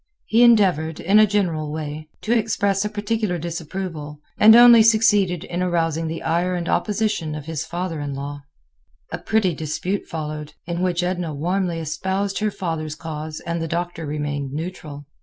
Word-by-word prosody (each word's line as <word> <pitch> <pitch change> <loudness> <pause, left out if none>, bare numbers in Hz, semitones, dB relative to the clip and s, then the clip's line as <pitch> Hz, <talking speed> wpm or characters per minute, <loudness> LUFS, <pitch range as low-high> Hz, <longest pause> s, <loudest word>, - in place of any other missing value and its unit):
He 225 +2 +3
endeavored, 185 -10 +4
in 200 +4 +4
a 215 - +6
general 170 -7 -1
way, 155 0 -6
to 230 +2 +1
express 205 -3 +1
a 210 - -2
particular 210 -2 -1
disapproval, 165 -2 -5 0.2
and 220 +1 +9
only 240 -1 +9
succeeded 210 -6 +3
in 175 +1 -4
arousing 165 -2 0
the 165 +1 -5
ire 175 +3 0
and 170 -1 -3
opposition 210 -7 -1
of 150 -2 -7
his 160 0 -4
father 175 -2 -4
in 145 -1 -4
law. 145 +1 -6 0.7
A - - -4
pretty 215 -5 +1
dispute 160 +6 -3
followed, 150 -2 -6
in 170 +1 -3
which 180 -1 0
Edna 175 -4 -2
warmly 175 +3 -1
espoused 190 +5 -2
her 215 0 +1
father's 160 -6 -4
cause 155 -1 -6
and 170 0 -2
the 165 - -2
Doctor 170 -1 -3
remained 145 -2 -3
neutral. 155 -3 -6
170 Hz, 165 wpm, -22 LUFS, 155-195 Hz, 0.7 s, and